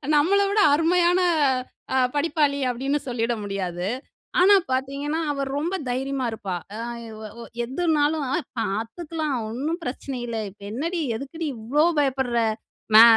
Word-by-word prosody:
நம்மள 360 +8 +4
விட 420 +1 +2
அருமையான 345 +3 +4 0.7
அ - - +2 0.2
படிப்பாளி 290 -2 +2
அப்டின்னு 270 +4 0
சொல்லிட 240 0 0
முடியாது. 185 -2 -3 0.5
ஆனா, 400 +2 +7 0.2
பாத்தீங்கன்னா 280 +4 -1
அவ 275 -1 -1
ரொம்ப 340 +6 -1
தைரியமா 265 +1 -1
இருப்பா. 195 -5 -3 0.2
அ - - -5 0.5
அ - - -13
ஒ - - -7 0.2
எதுனாலும் 300 +1 +1 0.4
"பாத்துக்கலாம், 280 - -2
ஒண்ணும் 300 +9 -2
பிரச்சனை 260 +1 -4
இல்ல. 230 -1 -3
இப்ப 200 +1 -21
என்னடி, 330 +9 -2 0.2
எதுக்குடி 310 +6 -5
இவ்ளோ 265 +8 +2
பயப்படுற? 265 -4 +1 0.6
மே 225 - +12
275 Hz, 130 wpm, -24 LUFS, 240-320 Hz, 0.7 s, மே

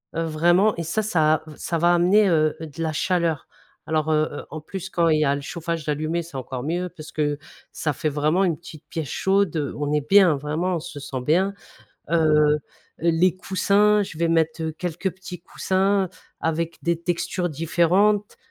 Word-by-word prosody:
Heu, 165 - 0
vraiment 175 +6 +3
et 170 - -4
ça 170 +7 -1
ça 155 -7 +2
v 155 - -11
ça 170 - -2
va 175 +2 +4
amener, 185 +5 +4
heu, 155 -3 +2
de 160 -1 -7
la 160 -1 -1
chaleur 165 0 0 0.4
alors, 155 0 0
heu 155 0 +2
heu, 145 - -7
en 155 +1 -6
plus 190 +4 -7
quand 170 -2 +1
il 155 -1 +3
y 155 - +3
a 140 0 +2
le 140 - -5
chauffage 165 +1 -4
d'allumé 155 +3 -1
c'est 165 -3 -13
encore 130 -1 -5
mieux, 175 +4 -2
parce 155 -1 -10
que 145 -1 -1 0.3
ça 150 - -2
fait 155 - -1
vraiment 150 +6 +1
une 170 -5 +1
petite 165 -3 -13
pièce 160 -3 -4
chaude, 195 -3 +1
heu, 145 -3 -2
on 145 0 -2
est 150 -1 0
bien 195 -5 +6
vraiment, 155 +6 -2
on - - -1
se 155 -2 -8
sent 135 -2 -5
bien, 180 +9 +2 0.6
heu 170 - +2 0.4
heu, - - -4 0.4
les 170 +2 +2
coussins 200 +2 +2
je 190 -5 -9
vais 170 +1 +1
mettre, 160 0 +1
heu, 160 0 -2
quelques 175 +3 -3
petits 180 -1 -9
coussins 190 +1 0 0.3
avec 165 +1 -2
des 170 -1 0
textures 175 +1 -1
différentes, 175 +7 +1
165 Hz, 200 wpm, -23 LUFS, 155-180 Hz, 0.6 s, bien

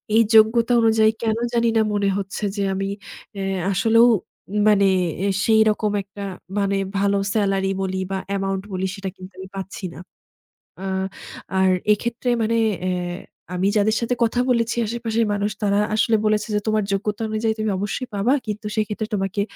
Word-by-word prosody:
এই 225 - +7
যোগ্যতা 230 +2 +5
অনুযায়ী 220 -1 +4
কেনো 225 0 0
জানিনা 230 -1 +2
মনে 200 -1 +1
হচ্ছে 195 +1 -5
যে, 200 - 0
আমি 195 +1 -2 0.5
এ - - -2 0.3
আসলেও 225 +5 +5 0.6
মানে 200 -2 +5 0.4
এ - - +1 0.2
সেইরকম 220 -1 +3
একটা 200 +1 -9 0.4
মানে 200 0 +1 0.2
ভালো 200 0 +2 0.2
সেলারি 195 -2 +1
বলি 190 0 -2
বা 190 - 0
অ্যামাউন্ট 195 -1 -1
বলি 185 +1 -1
সেটা 195 -1 -5
কিন্তু 185 +1 -11
আমি 190 0 -8
পাচ্ছি 195 0 -6
না। - - -10 0.8
আ - - -5 0.7
আর 190 0 +4 0.2
এক্ষেত্রে 235 +3 -3
মানে 230 +1 +1 0.3
এ - - +1 0.7
আমি 185 +2 +1
যাদের 215 +1 +3
সাথে 235 +1 0
কথা 230 +2 +1
বলেছি 230 -1 +1
আশেপাশের 230 0 -1
মানুষ 205 +1 -1
তারা 200 0 +2 0.2
আসলে 220 +1 +3
বলেছে 215 0 +1
যে - - +3
"তোমার 215 -1 +2
যোগ্যতা 210 +3 -2
অনুযায়ী 220 +1 0
তুমি 215 -1 0
অবশ্যই 205 +5 -3
পাবা। 210 +6 +2
কিন্তু 210 0 -4
সেক্ষেত্রে 215 0 -2
তোমাকে 195 0 -1
210 Hz, 160 wpm, -22 LUFS, 195-225 Hz, 0.8 s, এই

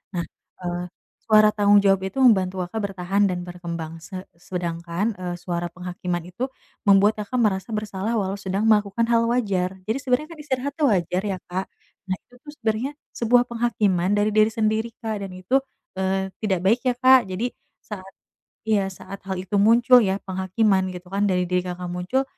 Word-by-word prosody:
nah, 170 - 0 0.4
eee, 175 0 -3 0.4
suara 215 -1 +6
tanggung 205 -1 +4
jawab 195 -1 +4
itu 265 +8 -1
membantu 190 -6 +4
Kakak, 180 +5 -4
bertahan 195 +1 +1
dan 180 -2 -3
berkembang 170 -2 -6
se 185 +3 -8 0.2
sedangkan, 175 +3 -3
eee, 180 -1 -3
suara 175 0 -3
penghakiman 180 0 -4
itu 180 +9 -4 0.4
membuat 200 +2 +5
Kakak, 210 +4 -5
merasa 210 +1 0
bersalah 210 +1 -2
walau 200 -2 -1
sedang 195 +1 -2
melakukan 210 +1 +3
hal 230 0 +4
wajar 200 -6 0
jadi 220 +6 -1
sebenarnya 270 +4 0
kan 325 - -11
istirahat 280 -2 -2
itu - - 0
wajar 180 -4 +1
ya 195 -2 -2
Kak, 190 +2 -1 0.4
nah 185 - 0
itu 220 - -25
tuh 295 - -11
sebenarnya 230 +2 -1 0.2
sebuah 240 +1 +3
penghakiman 205 -5 +1
dari 205 +1 +2
diri 215 0 +5
sendiri 220 +1 0
Kak, 220 -2 -2
dan 185 - -11
itu, 185 +9 +1 0.4
eee, 190 0 0
tidak 195 -4 0
baik 220 +6 +4
ya 250 - +2
Kak, 255 -2 +6
jadi 205 +7 -2 0.3
saat 195 -3 -8 0.6
iya 210 -3 +1
saat 195 +1 -9
hal 190 - -2
itu 190 +2 -1
muncul 235 +4 +6
ya 195 -3 0
penghakiman 190 +1 +1
gitu 180 +1 -11
kan 200 +1 +1
dari 180 -2 +2
diri 180 0 +1
Kakak, 180 0 -5
muncul, 180 +10 0
195 Hz, 175 wpm, -23 LUFS, 180-220 Hz, 0.6 s, suara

